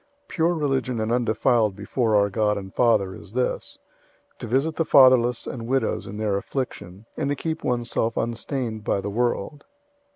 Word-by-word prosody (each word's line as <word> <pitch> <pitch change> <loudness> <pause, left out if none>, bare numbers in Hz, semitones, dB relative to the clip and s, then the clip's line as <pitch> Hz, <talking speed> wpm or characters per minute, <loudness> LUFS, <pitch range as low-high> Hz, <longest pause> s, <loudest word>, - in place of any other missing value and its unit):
001:027 - - -42
Pure 170 +1 +1
religion 135 -5 -1
and 110 +1 -1
undefiled 115 -2 +2
before 110 +2 0
our 100 -1 +3
God 105 0 +1
and 95 -1 -8
Father 105 -6 +2
is 95 - -12
this: 125 +1 -2 0.6
to - - -6
visit 135 +7 0
the 165 - +2
fatherless 130 -5 +5
and 115 -2 -6
widows 135 +1 -1
in 100 - -7
their 105 -2 0
affliction, 100 -5 -5
and 145 -3 -2
to 145 - 0
keep 160 +2 -4
oneself 120 -2 -1
unstained 115 -1 -3
by 100 - 0
the 100 +1 -4
world. 120 +4 -2
120 Hz, 170 wpm, -24 LUFS, 105-130 Hz, 0.6 s, fatherless